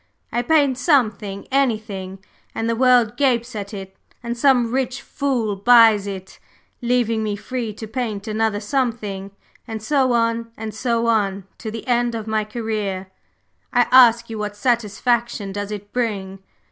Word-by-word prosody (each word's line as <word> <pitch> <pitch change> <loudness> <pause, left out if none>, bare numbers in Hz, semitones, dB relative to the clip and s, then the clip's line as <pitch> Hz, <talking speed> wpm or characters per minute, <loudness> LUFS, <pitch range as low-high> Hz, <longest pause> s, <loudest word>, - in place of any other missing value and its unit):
I 240 - 0
paint 280 -2 +2
something, 215 - +1
anything, 215 -7 -1 0.3
and 225 - -2
the 230 - +1
world 245 -3 +4
gapes 250 -4 +1
at 200 -1 -5
it, 190 -2 -8 0.3
and 235 0 -3
some 245 -2 +3
rich 260 0 -1
fool 255 -7 -2
buys 220 -1 +6
it, 190 -1 -7 0.4
leaving 235 -2 +1
me 210 -1 -1
free 235 +2 -4
to 220 - -7
paint 220 -3 -4
another 215 -1 0
something; 210 -5 -2 0.4
and 225 -1 -5
so 260 +2 +1
on 230 0 0
and 220 -1 -5
so 235 +1 0
on, 200 -4 +1 0.2
to 220 - -5
the 225 0 -7
end 240 -1 +1
of 220 -2 -4
my 220 -1 0
career. 210 -4 -4 0.6
I 245 - +4
ask 235 -2 +7
you 225 -1 -6
what 210 -1 -4
satisfaction 235 -1 0
does 205 +1 -4
it 205 -1 -7
bring? 200 -6 -2
225 Hz, 155 wpm, -21 LUFS, 205-245 Hz, 0.6 s, ask